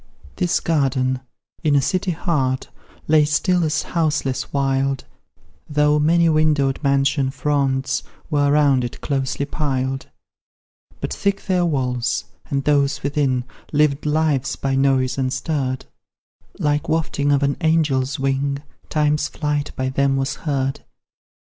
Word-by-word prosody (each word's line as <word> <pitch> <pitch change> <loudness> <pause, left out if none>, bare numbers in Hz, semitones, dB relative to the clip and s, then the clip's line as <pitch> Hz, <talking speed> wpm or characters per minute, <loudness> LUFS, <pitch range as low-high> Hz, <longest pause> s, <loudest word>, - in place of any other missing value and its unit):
This 175 -1 +1
garden, 130 -5 +1 0.4
in 150 -3 +2
a - - +6
city 185 +5 0
heart, 150 -7 -1 0.4
Lay 155 0 +5
still 175 +4 +2
as 155 -2 0
houseless 155 -6 -1
wild, 135 -1 0 0.6
Though 150 0 +3
many 170 +3 +4
windowed 155 -4 +2
mansion 140 -1 +2
fronts 135 -1 0 0.3
Were 145 -1 +3
round 145 -3 +4
it; 120 - -5
closely 135 0 -1
piled; 135 -3 -2 0.9
But - - -2
thick 200 0 -1
their 180 -3 +2
walls, 125 -5 0 0.3
and 140 -1 -1
those 140 -1 +2
within 140 -3 +1 0.3
Lived 150 -1 +2
lives 150 -3 +1
by 135 -1 -2
noise 135 -1 +2
unstirred; 130 0 -1 0.7
Like 150 0 0
wafting 145 -3 0
of 140 0 +3
an 140 0 +1
angel's 150 -5 +1
wing, 135 +1 -1 0.3
Time's 150 -1 +1
flight 150 -1 -2
by 130 -1 -1
them 135 0 +1
was 135 +1 -1 0.2
heard. 135 -1 -1
140 Hz, 125 wpm, -21 LUFS, 135-150 Hz, 0.9 s, a